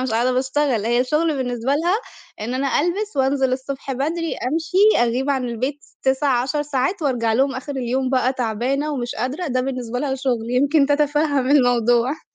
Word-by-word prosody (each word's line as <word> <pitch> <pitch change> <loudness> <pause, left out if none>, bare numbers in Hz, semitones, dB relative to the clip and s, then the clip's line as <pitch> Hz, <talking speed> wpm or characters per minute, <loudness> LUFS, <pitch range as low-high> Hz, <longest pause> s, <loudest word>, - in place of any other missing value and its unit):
أ - - -1
مش 260 - -2
قاعدة 235 +3 +1
باشتغل، 260 -3 0
هي 240 +1 +2
الشُّغل 305 +4 +1
بالنسبة 245 0 -1
لها 340 +5 +1 0.5
إن 235 +4 -3
أنا 270 +1 +1
ألبس 390 +5 -2
وأنزِل 265 -1 +1
الصبح 270 +1 -4
بدري، 320 +5 -2 0.2
أمشي، 365 - +3
أغيب 260 +4 -1
عن 265 -2 0
البيت 255 +4 -3
س - - -24
9، 265 -2 +2
10 295 +3 -1
ساعات 295 +6 -1
وأرجع 240 -6 +1
لهم 270 +4 +2
آخر 260 +2 -5
اليوم 255 +1 -1
بقى 255 -1 +2
تعبانة 260 +5 -1
ومش 245 -3 -3
قادرة، 260 +10 -3
ده 255 -3 0
بالنسبة 250 -2 -3
لها 270 0 -1
شُغل، 245 -4 -2
يمكن 280 +3 +3
تتفهم 290 -2 +1
الموضوع. 245 0 +3
265 Hz, 180 wpm, -21 LUFS, 250-290 Hz, 0.5 s, أمشي